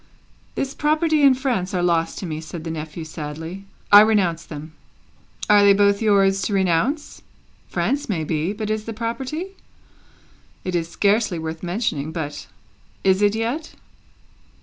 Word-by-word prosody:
"This 275 Hz, 0 st, -2 dB
property 310 Hz, +1 st, +1 dB
and 275 Hz, -3 st, +6 dB
France 230 Hz, -9 st, -1 dB
are 175 Hz, -, 0 dB
lost 165 Hz, -2 st, +1 dB
to -, -, -5 dB
me," 155 Hz, -2 st, -4 dB
said 160 Hz, +1 st, -8 dB
the 165 Hz, -, -4 dB
nephew, 160 Hz, +1 st, -6 dB
sadly; 160 Hz, +4 st, -7 dB, 0.3 s
"I 205 Hz, 0 st, +11 dB
renounce 195 Hz, -7 st, +2 dB
them." 155 Hz, 0 st, -9 dB, 0.8 s
"Are 210 Hz, -1 st, +6 dB
they 200 Hz, 0 st, +7 dB
both 200 Hz, +1 st, +3 dB
yours 195 Hz, -2 st, +3 dB
to 205 Hz, -, -2 dB
renounce? 195 Hz, -, 0 dB, 0.5 s
France 280 Hz, -2 st, -1 dB
may 170 Hz, -6 st, -1 dB
be, 155 Hz, +3 st, -1 dB
but 215 Hz, 0 st, -4 dB
is 215 Hz, 0 st, -2 dB
the 225 Hz, -, -5 dB
property? 260 Hz, -, -4 dB, 1.1 s
It 185 Hz, -, -3 dB
is 170 Hz, -1 st, -1 dB
scarcely 205 Hz, 0 st, +1 dB
worth 160 Hz, 0 st, -5 dB
mentioning; 175 Hz, -5 st, -2 dB
but, 145 Hz, -3 st, -5 dB, 0.6 s
is 190 Hz, 0 st, +3 dB
it 205 Hz, 0 st, +3 dB
yet?" 240 Hz, +8 st, -3 dB
195 Hz, 150 wpm, -22 LUFS, 165-225 Hz, 1.1 s, I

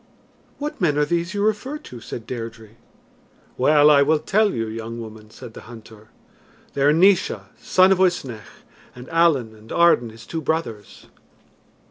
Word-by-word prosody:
"What 300 Hz, -2 st, -6 dB
men 150 Hz, -5 st, +1 dB
are 150 Hz, -, +2 dB
these 170 Hz, +4 st, -2 dB
you 200 Hz, -, -1 dB
refer 235 Hz, +7 st, -2 dB
to?" 125 Hz, -, -12 dB
said 115 Hz, -, -8 dB
Deirdre. 115 Hz, -2 st, -7 dB, 0.9 s
"Well, 150 Hz, +3 st, +5 dB
I 140 Hz, -1 st, +5 dB
will 155 Hz, +3 st, +3 dB
tell 205 Hz, +7 st, +1 dB
you, 115 Hz, -7 st, -3 dB
young 115 Hz, +1 st, -7 dB
woman," 110 Hz, -1 st, -10 dB
said 110 Hz, +1 st, -12 dB
the -, -, -13 dB
hunter. 110 Hz, -2 st, -14 dB, 0.6 s
"They 140 Hz, -, -3 dB
are 145 Hz, +2 st, +5 dB
Naois, 185 Hz, +4 st, +3 dB, 0.2 s
son 185 Hz, +1 st, +3 dB
of 190 Hz, -, +3 dB
Uisnech, 135 Hz, -, -2 dB, 0.3 s
and 125 Hz, +1 st, -11 dB
Allen 160 Hz, -9 st, +2 dB
and 110 Hz, +1 st, -16 dB
Arden 170 Hz, -9 st, +3 dB
his 115 Hz, +1 st, -14 dB
two 165 Hz, -, -5 dB
brothers." 115 Hz, -, -4 dB
140 Hz, 160 wpm, -22 LUFS, 115-170 Hz, 0.9 s, Well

